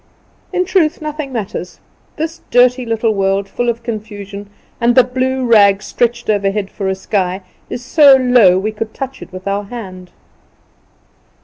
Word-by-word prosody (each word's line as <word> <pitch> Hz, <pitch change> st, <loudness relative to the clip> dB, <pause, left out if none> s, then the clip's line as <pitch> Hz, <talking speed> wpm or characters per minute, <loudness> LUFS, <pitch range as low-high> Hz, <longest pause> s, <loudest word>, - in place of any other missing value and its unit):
In 365 Hz, -1 st, 0 dB
truth, 350 Hz, -4 st, +1 dB
nothing 305 Hz, -2 st, -5 dB
matters. 205 Hz, -6 st, -5 dB, 0.4 s
This 325 Hz, +1 st, -4 dB
dirty 250 Hz, 0 st, +3 dB
little 225 Hz, 0 st, 0 dB
world 195 Hz, 0 st, 0 dB
full 240 Hz, +4 st, -2 dB
of 235 Hz, 0 st, -3 dB
confusion, 205 Hz, -3 st, -7 dB, 0.3 s
and 235 Hz, 0 st, +2 dB
the 255 Hz, -, +7 dB
blue 260 Hz, +1 st, -1 dB
rag, 205 Hz, -4 st, +5 dB
stretched 235 Hz, 0 st, -1 dB
overhead 200 Hz, -1 st, 0 dB
for 195 Hz, -, -4 dB
a 190 Hz, -, 0 dB
sky, 190 Hz, -1 st, -2 dB, 0.3 s
is 245 Hz, -, -6 dB
so 285 Hz, -1 st, +7 dB
low 245 Hz, -8 st, +5 dB
we 210 Hz, +3 st, -1 dB
could 220 Hz, +1 st, -6 dB
touch 270 Hz, 0 st, -6 dB
it -, -, -10 dB
with 185 Hz, +1 st, -9 dB
our 200 Hz, +1 st, -1 dB
hand. 190 Hz, -5 st, -9 dB
225 Hz, 155 wpm, -16 LUFS, 200-255 Hz, 0.4 s, the